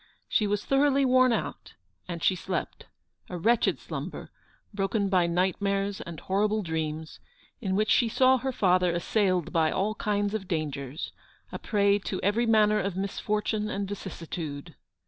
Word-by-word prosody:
She 210 - +1
was 205 0 -1
thoroughly 275 0 +3
worn 255 0 +5
out, 225 - -3 0.3
and 170 -2 -5
she 190 - +3
slept; 185 +1 -4 0.4
a 180 - -4
wretched 225 +7 +2
slumber, - - -7 0.4
broken 200 0 0
by 180 -3 +3
nightmares 195 +3 0
and 170 -3 -7
horrible 210 +2 0
dreams, 160 -1 -4 0.4
in 190 -4 -1
which 215 +2 +1
she 235 - +4
saw 260 +2 +4
her 265 +2 -2
father 180 -6 +3
assailed 185 -1 0
by 160 -1 +3
all 205 +6 0
kinds 205 -1 -1
of 205 -4 -3
dangers, 145 -4 -3 0.4
a - - -5
prey 200 -1 +2
to 190 -1 -4
every 225 +4 +2
manner 215 -1 +4
of 195 -1 -2
misfortune 210 +2 -1
and 200 -1 -3
vicissitude. 165 -7 -6
200 Hz, 150 wpm, -27 LUFS, 180-215 Hz, 0.4 s, worn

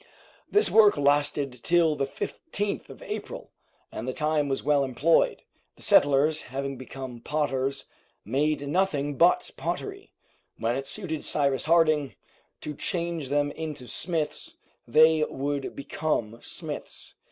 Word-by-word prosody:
This 420 +1 +3
work 210 -5 +6
lasted 145 -3 +1
till 170 -3 +3
the 140 -1 -1
15th 205 - -4
of - - -11
April, - - -6 0.4
and 115 - -6
the 130 - -1
time 150 -1 0
was 135 - -2
well 145 -1 +3
employed. 135 +5 +2 0.3
The - - -9
settlers, 145 +2 +4
having 135 +1 -4
become 130 -1 -8
potters, 135 -1 -1 0.4
made 145 +5 0
nothing 145 -4 0
but 170 +5 +3
pottery. 395 0 -4 0.5
When 115 +1 0
it 135 +1 -4
suited 160 0 -3
Cyrus 140 -3 0
Harding 155 -4 +3 0.5
to 150 - -5
change 170 -2 -3
them 145 0 +1
into 150 -5 -6
smiths, 165 0 -3 0.3
they 155 +5 +5
would 140 0 -3
become 130 -6 -2
smiths. - - -6
145 Hz, 130 wpm, -27 LUFS, 135-160 Hz, 0.5 s, work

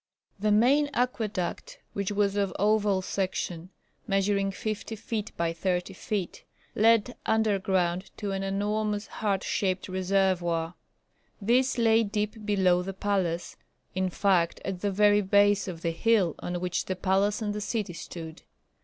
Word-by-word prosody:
The 210 +1 +1
main 270 +8 +4
aqueduct 220 -7 -2 0.2
which 200 0 -2
was 200 -1 +1
of 200 -2 +1
oval 205 -2 +2
section, 185 -3 -3 0.4
measuring 195 -1 +1
fifty 215 +2 -4
feet 215 0 -4
by 165 -1 0
thirty 180 +2 -1
feet, 190 -1 -4 0.3
led 230 +2 +3
underground 190 -4 +1
to 205 -2 -3
an 195 0 -2
enormous 205 +2 -1
heart 200 -3 -2
shaped 185 -2 -1
reservoir. 185 -3 0 0.7
This 255 +5 +2
lay 225 -1 +4
deep 210 +1 -2
below 185 -3 +3
the 195 +2 -5
palace, 190 -4 -1 0.4
in 185 0 0
fact 180 -2 +1
at 190 -2 -4
the 205 - +1
very 205 +1 +4
base 205 +1 +3
of 170 -3 -6
the 165 - +1
hill 190 -1 +2
on 175 0 -3
which 180 0 -2
the 185 - -2
palace 195 +3 +1
and 210 -2 -2
the 210 - -4
city 210 -4 -2
stood. 165 -1 -8
200 Hz, 145 wpm, -28 LUFS, 185-210 Hz, 0.7 s, main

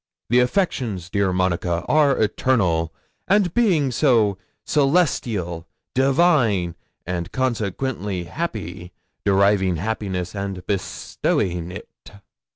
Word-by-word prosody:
The 120 - +5
affections, 125 - 0
dear 100 -2 +1
Monica, 90 -2 0
are 145 -3 +4
eternal; 95 -8 +1 0.4
and 195 -3 +3
being 175 - +2
so, 115 -6 +3 0.3
celestial, 120 - +1 0.3
divine, 130 - +3 0.3
and 85 0 -3
consequently 110 -5 -2
happy, 90 - -5 0.3
deriving 100 -2 +3
happiness, 95 -1 -3
and 100 -2 -5
bestowing 90 -2 -2
it." - - -8
100 Hz, 90 wpm, -22 LUFS, 90-130 Hz, 0.4 s, The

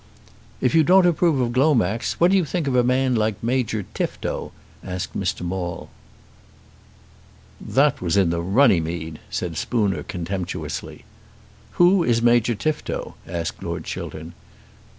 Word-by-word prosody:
"If 125 - +2
you 160 -1 +5
don't 185 +3 +5
approve 170 -4 +2
of 120 -2 0
Glomax, 120 - +2
what 175 +2 +3
do 195 - +5
you 185 - +3
think 165 +1 -2
of 135 -2 0
a 125 - +4
man 130 +1 +2
like 110 -2 +1
Major 115 -4 -1
Tifto?" - - -3 0.3
asked 90 -1 -5
Mr. - - -2
Maule. 90 -1 -4 1.7
"That 140 +1 +2
was 90 +2 0
in 95 -4 +3
the 85 0 -1
Runnymede," 85 - +1
said 85 -3 -4
Spooner 105 -3 0
contemptuously. 90 +1 -5 0.7
"Who 175 +1 +4
is 120 -6 +2
Major 120 0 +3
Tifto?" 155 +8 -3
asked 85 -1 -4
Lord - - -4
Chiltern. 80 +2 -7
115 Hz, 135 wpm, -22 LUFS, 90-140 Hz, 1.7 s, you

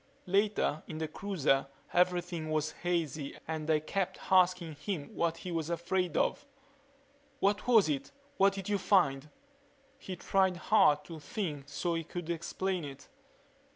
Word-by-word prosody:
Later, 195 -5 +1
in 155 - -6
the 160 0 -2
cruiser, 155 -9 0 0.3
everything 175 -2 +1
was 155 0 0
hazy 160 -5 -2
and 155 -1 -3
they 155 -1 +4
kept 185 +4 -2
asking 180 -3 +4
him 150 -1 -4
what 165 -1 0
he 180 - -6
was 165 -1 -2
afraid 175 0 -1
of. 285 - 0 0.9
"What 200 +3 +1
was 225 -7 +6
it 145 -3 -2 0.3
what 195 0 +5
did 195 -1 -6
you 205 -1 +1
find?" 150 -9 +2 0.7
He 190 -8 -6
tried 190 0 +2
hard 150 -7 +4
to 165 -2 -8
think 145 -3 -4
so 140 +5 -1
he 165 0 -1
could 170 +1 -5
explain 180 +2 -2
it. 140 -1 -9
170 Hz, 150 wpm, -32 LUFS, 155-190 Hz, 0.9 s, was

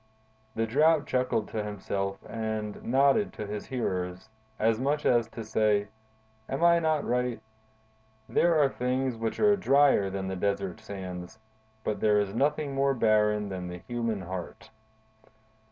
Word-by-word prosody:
'" 110 0 -37
The 115 - +1
Drought 150 +6 +3
chuckled 125 -4 0
to 110 - -3
himself 100 -1 -3
and 110 -2 -4
nodded 140 - +3
to 105 - -5
his 105 0 -6
hearers, 95 -5 -3 0.3
as 110 0 +2
much 145 +3 0
as 120 -2 +3
to 115 - -8
say: 105 -1 +1 0.6
"Am 135 +5 -2
I 170 0 +6
not 155 -2 +1
right? 125 -1 0 0.9
There 170 -1 +3
are 145 - +5
things 130 0 -1
which 115 0 -3
are 210 -1 +5
drier 140 - +4
than 95 0 -4
the 95 - -3
desert 100 -1 -2
sands, 90 0 -7 0.5
but 105 - -2
there 105 -1 +3
is 100 -1 -1
nothing 145 +3 0
more 135 0 +2
barren 105 -2 +2
than 90 -2 -5
the 90 0 -6
human 115 +1 -3
heart." 90 -1 -7
110 Hz, 155 wpm, -28 LUFS, 100-135 Hz, 0.9 s, I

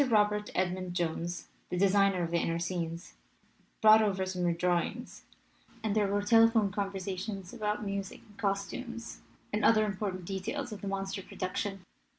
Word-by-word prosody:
Robert 210 -1 +3
Edmund 185 -1 -1
Jones, 175 0 -2 0.2
the 180 - -2
de 200 +2 +5
signer 195 -2 +3
of 165 - -3
the 170 - +2
inner 165 0 0
scenes, 170 -1 -3 0.7
brought 220 0 +8
over 195 -3 +1
some 185 -1 -3
new 175 - +3
drawings, 175 +7 -1 0.6
and 215 -2 0
there 210 -2 +3
were 205 +1 0
telephone 225 -2 +5
conversations 195 0 -4
about 210 -2 -2
music 195 -1 -4
and 210 - -19
costumes 230 +4 -3 0.3
and 210 - 0
other 215 -1 +5
important 195 -3 -3
details 200 +8 -3
of 210 - -7
the 200 - -5
monster 195 0 -3
production. 190 +1 -4
195 Hz, 160 wpm, -31 LUFS, 185-210 Hz, 0.7 s, brought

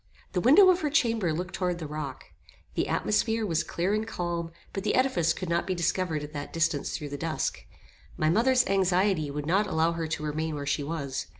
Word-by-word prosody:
The 180 - 0
window 325 - +7
of 360 - 0
her 300 - 0
chamber 230 - +2
looked 180 +4 -4
toward 180 -2 -1
the 165 - -6
rock. 150 -3 -5 0.5
The - - 0
atmosphere 225 +1 +1
was 170 -4 0
clear 175 +4 -1
and 215 +1 -1
calm, 170 -5 -3 0.2
but 195 - -3
the - - +1
edifice 185 -11 +2
could 185 +2 -4
not 170 +1 0
be 185 - 0
discovered 170 -2 -1
at 150 +1 -8
that 145 -1 -5
distance 160 -3 0
through 150 -3 -6
the 145 0 -6
dusk. 160 -1 -2 0.5
My 155 - +1
mother's 250 +6 +4
anxiety 190 -4 +2
would 145 +1 -4
not 195 +6 +2
allow 160 -1 +2
her 165 -1 -3
to 155 -1 -3
remain 155 +1 -2
where 145 -1 -4
she 145 +1 0
was. 140 -3 -4
170 Hz, 210 wpm, -28 LUFS, 155-200 Hz, 0.5 s, window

